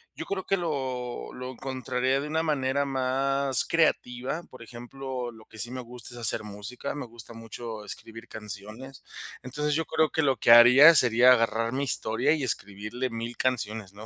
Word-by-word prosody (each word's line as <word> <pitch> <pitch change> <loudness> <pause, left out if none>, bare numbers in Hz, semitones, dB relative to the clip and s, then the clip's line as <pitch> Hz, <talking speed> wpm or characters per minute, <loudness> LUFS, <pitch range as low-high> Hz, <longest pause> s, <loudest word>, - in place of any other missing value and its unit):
Yo - - -6
creo 190 -2 -4
que 195 - +1
lo 130 - -4
lo 125 0 -7
encontraría 130 0 -2
de 145 - -4
una 160 +2 -1
manera 140 -2 0
más 135 0 +1
creativa, 145 -1 0
por 130 - -14
ejemplo, 125 +1 -7
lo 110 -1 -16
que - - -15
sí 120 +3 0
me 130 - -5
gusta 120 0 -8
es - - -8
hacer 110 -1 0
música, 105 +6 -7
me 145 - -5
gusta 115 0 -12
mucho 115 -1 -8
escribir 115 +2 -8
canciones. 110 +5 -9 0.4
Entonces, 150 +4 -2
yo 165 +1 -1
creo 160 0 +1
que 160 - 0
lo 135 -2 +2
que 115 - +3
haría 125 +7 +9
sería 125 -1 +6
agarrar 115 -1 +2
mi 135 +2 -2
historia 115 +1 +2
y 150 -4 -2
escribirle 105 +2 -3
1000 115 +1 -6
canciones, 110 -6 -2
¿no?, 105 +2 -11
125 Hz, 180 wpm, -27 LUFS, 115-135 Hz, 0.4 s, haría